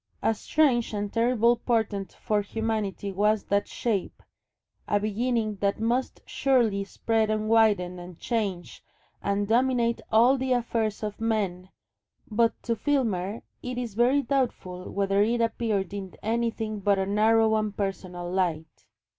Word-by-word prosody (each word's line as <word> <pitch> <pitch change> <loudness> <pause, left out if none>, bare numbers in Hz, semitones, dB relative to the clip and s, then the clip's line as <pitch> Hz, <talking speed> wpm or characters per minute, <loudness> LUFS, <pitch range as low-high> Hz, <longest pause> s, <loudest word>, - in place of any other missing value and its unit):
A 225 - +3
strange 245 -1 +1
and 205 0 -3
terrible 235 0 +3
portent 220 -5 -1
for 210 -1 0
humanity 210 -2 -3
was 210 +2 +2
that 200 0 0
shape, 215 -6 -3 0.6
a 205 - +2
beginning 215 0 -1
that 200 +1 0
must 240 +4 -1
surely 235 -7 +1
spread 220 +2 0
and 215 0 -1
widen 205 -5 +3
and 175 -1 -10
change 200 -7 -3 0.4
and 200 0 0
dominate 235 0 +2
all 245 +5 +5
the 260 0 +1
affairs 230 -3 -1
of 210 +1 -5
men, 195 -5 -1 0.6
but 230 +1 +2
to 230 - 0
Filmer 225 -7 -1 0.2
it 250 0 -5
is 240 -4 -4
very 250 +6 +3
doubtful 210 -10 -2
whether 195 0 +1
it 235 +3 +2
appeared 220 -4 -1
in 195 -3 -6
anything 225 -1 -1
but 200 0 +2
a 190 - 0
narrow 220 +2 +3
and 215 -2 -1
personal 185 -3 -4
light. 160 - -2
215 Hz, 140 wpm, -27 LUFS, 200-235 Hz, 0.6 s, all